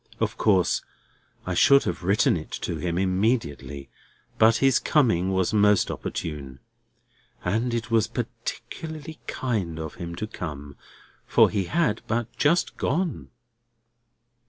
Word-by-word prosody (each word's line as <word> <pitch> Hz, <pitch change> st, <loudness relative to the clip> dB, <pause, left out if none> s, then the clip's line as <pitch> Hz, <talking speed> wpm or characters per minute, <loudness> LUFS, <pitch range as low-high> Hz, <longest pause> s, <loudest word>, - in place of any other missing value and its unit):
Of -, -, -1 dB
course 95 Hz, -5 st, +2 dB, 0.6 s
I 90 Hz, -, -2 dB
should 140 Hz, +10 st, +6 dB
have -, -, -3 dB
written 100 Hz, +2 st, +3 dB
it 80 Hz, -2 st, -6 dB
to 85 Hz, -, -2 dB
him 85 Hz, +2 st, -2 dB
immediately; 95 Hz, -, -1 dB, 0.5 s
but 110 Hz, +1 st, +6 dB
his 135 Hz, 0 st, +3 dB
coming 95 Hz, -, +2 dB
was 95 Hz, +1 st, +1 dB
most 105 Hz, -2 st, +4 dB
opportune. 70 Hz, -5 st, -5 dB, 0.9 s
And 110 Hz, +7 st, 0 dB
it 115 Hz, -1 st, -3 dB
was 115 Hz, -2 st, +3 dB
particularly 160 Hz, 0 st, -6 dB
kind 100 Hz, -11 st, -2 dB
of 80 Hz, -1 st, -5 dB
him 85 Hz, 0 st, -5 dB
to 110 Hz, -, -3 dB
come, 75 Hz, -8 st, -7 dB, 0.5 s
for -, -, +5 dB
he 100 Hz, -3 st, 0 dB
had 150 Hz, -, 0 dB
but 115 Hz, +1 st, -2 dB
just 165 Hz, +4 st, +1 dB
gone." 170 Hz, +3 st, -1 dB
105 Hz, 130 wpm, -25 LUFS, 85-120 Hz, 0.9 s, should